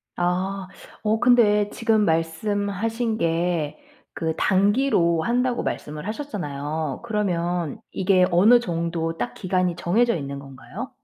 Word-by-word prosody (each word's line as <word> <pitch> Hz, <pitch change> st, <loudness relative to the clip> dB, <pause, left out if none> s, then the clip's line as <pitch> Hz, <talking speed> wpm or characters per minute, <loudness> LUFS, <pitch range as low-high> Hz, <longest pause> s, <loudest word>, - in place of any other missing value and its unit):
아. 185 Hz, +2 st, -1 dB, 0.4 s
어 220 Hz, +1 st, +1 dB
근데 210 Hz, -4 st, +4 dB
지금 220 Hz, -2 st, +1 dB
말씀하신 205 Hz, +7 st, -1 dB
게 165 Hz, -3 st, 0 dB, 0.4 s
그 160 Hz, -1 st, 0 dB
"단기로 190 Hz, -4 st, +2 dB
한다."고 245 Hz, +2 st, 0 dB
말씀을 150 Hz, +4 st, -5 dB
하셨잖아요. 155 Hz, -, -4 dB
그러면 175 Hz, -7 st, -1 dB
이게 185 Hz, -1 st, +3 dB
어느 210 Hz, +8 st, +6 dB
정도 165 Hz, -5 st, -2 dB
딱 -, -, -3 dB
기간이 185 Hz, -2 st, 0 dB
정해져 235 Hz, +9 st, +2 dB
있는 140 Hz, -3 st, -5 dB
건가요? 140 Hz, -, -8 dB
185 Hz, 255 characters per minute, -23 LUFS, 165-220 Hz, 0.4 s, 어느